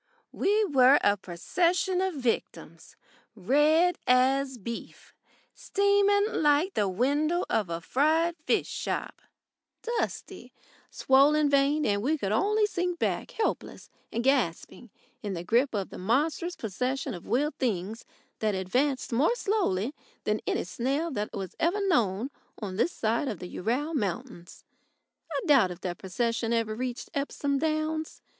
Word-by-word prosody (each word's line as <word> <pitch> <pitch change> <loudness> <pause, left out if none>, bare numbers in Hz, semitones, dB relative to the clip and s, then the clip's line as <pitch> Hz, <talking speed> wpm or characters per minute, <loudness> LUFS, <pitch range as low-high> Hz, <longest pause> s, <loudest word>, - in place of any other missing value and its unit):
We 420 +2 +2
were 270 -5 +6
a 205 - +4
procession 345 - 0
of 380 -3 -1
victims 250 -4 -4 0.4
red 300 - +3
as 260 +1 +3
beef, 235 +2 -8 0.4
steaming 405 0 +2 0.2
like 300 +5 +3
the 205 - +1
window 290 - +1
of 205 -5 +1
a 165 0 -3
fried 315 - +2
fish - - +2
shop, - - -4 0.6
dusty, 470 0 -4 0.4
swollen 285 +2 +4
veined 280 +2 +3
and 200 -1 +1
we 300 +8 +1
could 200 -8 -2
only 420 - +2
sink 360 -3 -2
back - - -1
helpless 445 - -3 0.2
and 235 - -2
gasping 245 -3 0 0.3
in 200 -3 -4
the 170 - -5
grip 235 +7 +2
of 195 -2 -3
the - - -8
monstrous 300 - 0
procession 250 +6 -3
of 175 - -9
wheeled 290 +5 0
things 220 -2 -2 0.4
that 215 -2 0
advanced 255 +10 0
more 295 - +3
slowly 305 - 0 0.3
than 210 0 0
any - - 0
snail 270 - -2
that 210 -5 -3
was 190 -2 -6
ever 350 +5 +1
known 235 - +1 0.3
on 195 -4 -5
this 235 - +1
side 230 +2 -1
of 215 - -3
the 180 - -8
Ural 255 - -2
Mountains. 185 - -4 0.7
I 285 - -1
doubt 270 -11 +5
if 180 0 -8
that 175 -2 -4
procession 230 +4 -1
ever 225 -2 0
reached 245 +2 -5
Epsom 280 0 -1
Downs. 315 0 -2
265 Hz, 140 wpm, -28 LUFS, 215-315 Hz, 0.7 s, were